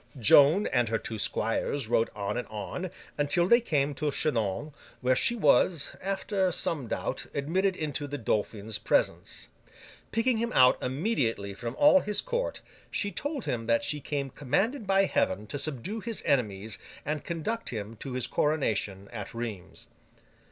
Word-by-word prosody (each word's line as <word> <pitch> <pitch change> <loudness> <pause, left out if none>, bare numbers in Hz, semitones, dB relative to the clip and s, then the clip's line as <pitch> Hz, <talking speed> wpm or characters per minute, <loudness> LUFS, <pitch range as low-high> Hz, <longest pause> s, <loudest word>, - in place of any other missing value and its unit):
Joan 145 - +6
and 120 -4 +1
her 115 - +1
two 110 -1 -6
squires 115 +5 -1
rode 115 0 +2
on 100 0 -2
and 125 - -3
on, 110 - -5 0.3
until 160 +4 +3
they 235 +4 +6
came 145 -9 +1
to 145 +2 -1
Chinon, 140 -1 -1 0.3
where 130 0 +2
she 235 - +2
was, 155 - +3
after 195 0 0
some 150 -6 -1
doubt, - - -3
admitted 185 +7 +1
into 150 -3 -3
the 145 +1 -4
Dauphin's 105 -2 -2
presence. - - 0 0.6
Picking 230 +1 +2
him 235 +1 -1
out 125 -1 +5
immediately 125 - -1
from 115 +4 -5
all 290 -1 +6
his 210 -5 -1
court, - - -2 0.3
she 205 - -1
told 285 0 -3
him 115 -2 -2
that 115 0 +3
she 150 -1 -1
came 140 -1 -3
commanded 200 - -1
by 195 0 +4
Heaven 100 - 0
to 145 +6 -4
subdue 155 - -2
his 230 0 -4
enemies 110 -5 0 0.3
and 150 0 -2
conduct 170 +8 -3
him 110 -1 -5
to 130 +3 -6
his 125 -2 -1
coronation 105 -10 0
at 105 -1 -6
Rheims. 110 - -6
140 Hz, 160 wpm, -29 LUFS, 115-190 Hz, 0.6 s, Joan